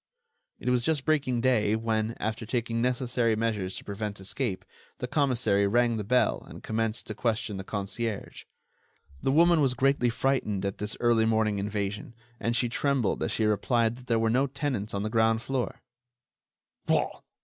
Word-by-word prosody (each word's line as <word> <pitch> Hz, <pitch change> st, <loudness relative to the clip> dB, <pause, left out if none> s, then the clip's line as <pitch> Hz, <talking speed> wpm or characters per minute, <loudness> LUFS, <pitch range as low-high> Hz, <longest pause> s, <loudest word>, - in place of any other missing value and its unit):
It -, -, -3 dB
was 125 Hz, -1 st, +2 dB
just 150 Hz, -2 st, +1 dB
breaking 140 Hz, -6 st, +1 dB
day 110 Hz, -4 st, +3 dB
when, 110 Hz, 0 st, -1 dB
after 110 Hz, +1 st, -2 dB
taking 115 Hz, 0 st, -1 dB
necessary 120 Hz, -2 st, +1 dB
measures 105 Hz, -4 st, -1 dB
to -, -, -6 dB
prevent 100 Hz, 0 st, -5 dB
escape, 100 Hz, +1 st, -3 dB, 0.3 s
the -, -, -3 dB
commissary 120 Hz, -8 st, +2 dB
rang 120 Hz, +2 st, +2 dB
the 105 Hz, -, -2 dB
bell 125 Hz, +5 st, +2 dB
and -, -, -11 dB
commenced 110 Hz, 0 st, -1 dB
to 110 Hz, -, -5 dB
question 110 Hz, -1 st, -1 dB
the 95 Hz, -, -5 dB
concierge. 105 Hz, +2 st, -4 dB, 0.8 s
The 135 Hz, -, +1 dB
woman 170 Hz, +2 st, +5 dB
was 130 Hz, -3 st, +2 dB
greatly 130 Hz, -1 st, +2 dB
frightened 115 Hz, -6 st, 0 dB
at 100 Hz, -, -3 dB
this 105 Hz, +1 st, -3 dB
early 120 Hz, -2 st, +3 dB
morning 110 Hz, -2 st, +1 dB
invasion, 105 Hz, +2 st, -3 dB, 0.2 s
and 115 Hz, 0 st, 0 dB
she 120 Hz, -, +2 dB
trembled 130 Hz, -3 st, 0 dB
as -, -, -1 dB
she 110 Hz, -, +1 dB
replied 115 Hz, +2 st, +2 dB
that 125 Hz, 0 st, -14 dB
there 115 Hz, -, +2 dB
were 110 Hz, 0 st, +2 dB
no 130 Hz, +4 st, +3 dB
tenants 125 Hz, -7 st, -3 dB
on 100 Hz, -, -1 dB
the 110 Hz, -, -1 dB
ground 115 Hz, 0 st, +2 dB
floor. 135 Hz, -2 st, -3 dB
115 Hz, 170 wpm, -28 LUFS, 105-125 Hz, 0.8 s, woman